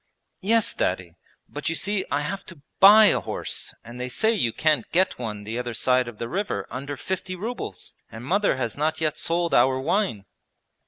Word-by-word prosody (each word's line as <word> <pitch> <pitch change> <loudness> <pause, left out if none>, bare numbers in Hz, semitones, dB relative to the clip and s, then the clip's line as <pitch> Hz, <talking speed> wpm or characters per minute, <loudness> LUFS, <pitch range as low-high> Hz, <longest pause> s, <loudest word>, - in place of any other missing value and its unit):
'Yes, 225 +3 +2
Daddy, 90 -2 -2 0.3
but - - -4
you 165 - -1
see 200 +2 0
I 145 - 0
have 185 +7 -4
to 160 -6 -10 0.2
buy 210 +3 +9
a - - +1
horse; - - -3
and 120 +3 -9
they 125 - -3
say 220 - +2
you 120 - +1
can't 150 -2 0
get 185 -3 +2
one 105 -4 -5
the 110 +3 -4
other 120 -2 -4
side 125 +2 +2
of 120 -3 -8
the 115 - -4
river 185 - -2
under 140 +3 -5
fifty 185 +2 -4
rubles, 210 - -5 0.2
and 115 +2 -9
mother 200 +4 +2
has 115 -4 -2
not 155 +2 -1
yet 155 -2 0
sold 170 0 0
our 130 +2 +4
wine.' 150 - 0
145 Hz, 195 wpm, -25 LUFS, 120-190 Hz, 0.3 s, buy